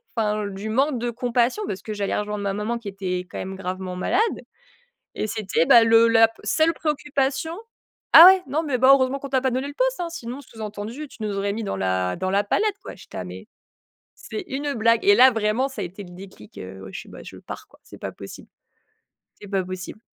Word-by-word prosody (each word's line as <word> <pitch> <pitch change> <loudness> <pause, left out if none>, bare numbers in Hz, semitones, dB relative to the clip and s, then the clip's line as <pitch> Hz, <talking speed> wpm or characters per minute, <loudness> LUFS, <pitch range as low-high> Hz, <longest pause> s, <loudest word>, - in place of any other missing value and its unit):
enfin, 210 -2 0
du 200 +2 -6
manque 265 +3 +1
de 240 0 -2
compassion 245 - 0
parce 190 - -5
que 215 - -6
j'allais 200 -1 -2
rejoindre 210 0 -3
ma 195 -1 -1
maman 210 +3 -2
qui 230 -3 -10
était 190 -2 -3
quand - - -8
même 190 +1 -5
gravement 185 -1 -5
malade 320 - 0 1.0
et - - -2
c'était, 210 -6 0
bah 235 - +8
le 225 0 +6
la 225 0 +6
p 225 - -20
seule 320 +1 +2
préoccupation. 290 -1 -1 0.6
«Ah 330 - +13
ouais, 380 0 +8
non 295 +5 -1
mais, 275 -5 -1
bah, 260 +2 +5
heureusement 275 0 +3
qu'on 275 - -7
t'a 260 -1 +1
pas 260 - 0
donné 260 +2 -2
le 285 - -9
poste, - - +1
hein!», 345 - -2
sinon 255 -4 -7
sous 230 -4 -15
entendu: 215 +7 -6
«Tu - - -16
nous 205 -1 -3
aurais 200 0 -1
mis 220 +2 -4
dans 200 - -3
la 95 -1 -1
dans 185 +1 -2
la 200 +1 +2
panade, 425 - +1
quoi». - - -8
J'étais - - -11
là: - - -4
«Mais, - - -10 0.7
c'est 420 - -7
une 280 +1 -3
blague!» 230 0 +2
et 205 - +6
là, 255 +4 +7
vraiment, 225 +3 0
ça 265 -5 -8
a - - -2
été 185 +4 -8
le 175 - -13
déclic, 180 - -13
heu, 95 +1 -9
oui 95 - -10
je - - -6
fais: - - -17
«Bah - - -11
je - - -11
pars - - -9
quoi, - - -23
c'est - - -13
pas - - -6
possible, - - -11 0.9
c'est 205 - -10
pas 195 -2 0
possible». 185 +3 -7
225 Hz, 235 wpm, -23 LUFS, 195-265 Hz, 1.0 s, Ah